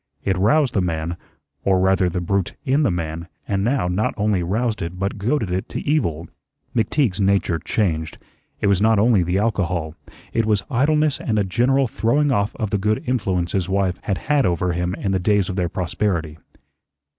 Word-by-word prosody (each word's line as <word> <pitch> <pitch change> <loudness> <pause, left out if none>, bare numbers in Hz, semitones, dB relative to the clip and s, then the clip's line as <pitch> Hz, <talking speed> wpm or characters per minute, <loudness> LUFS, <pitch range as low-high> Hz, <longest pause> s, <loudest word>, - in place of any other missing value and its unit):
It 95 - +1
roused 120 +8 +3
the 100 - +2
man, 85 -1 -2 0.5
or 95 -1 +3
rather 95 -1 +3
the 90 +1 -3
brute 95 +1 -1
in 135 +3 +2
the 145 - +3
man, 85 -1 -3 0.2
and 100 -1 0
now 125 -3 +1
not 90 +5 0
only 105 -3 +1
roused 110 +6 -1
it, 85 +2 -4
but 95 +2 -3
goaded 110 -2 0
it 95 +1 -2
to - - -4
evil. 85 - 0 0.5
McTeague's 115 - +1
nature 95 -4 +2
changed. 80 -5 -1 0.4
It - - 0
was 100 -1 +3
not 110 0 +4
only 110 -1 +4
the 90 +2 0
alcohol, 90 -7 -1 0.4
it 115 -1 +1
was 105 -2 +1
idleness 150 +3 +2
and 110 -3 -1
a 105 - +3
general 125 +8 +2
throwing 130 +5 +1
off 100 -3 0
of 110 -3 -3
the 105 - +1
good 105 +2 0
influence 95 -8 -1
his 95 -2 -1
wife 95 -2 0
had 100 -3 -2
had 140 - +1
over 90 -1 0
him 90 +2 -1
in 100 - -2
the 95 - +1
days 100 0 +2
of 95 - -3
their 90 -3 0
prosperity. 85 -3 -2
100 Hz, 190 wpm, -21 LUFS, 90-110 Hz, 0.5 s, not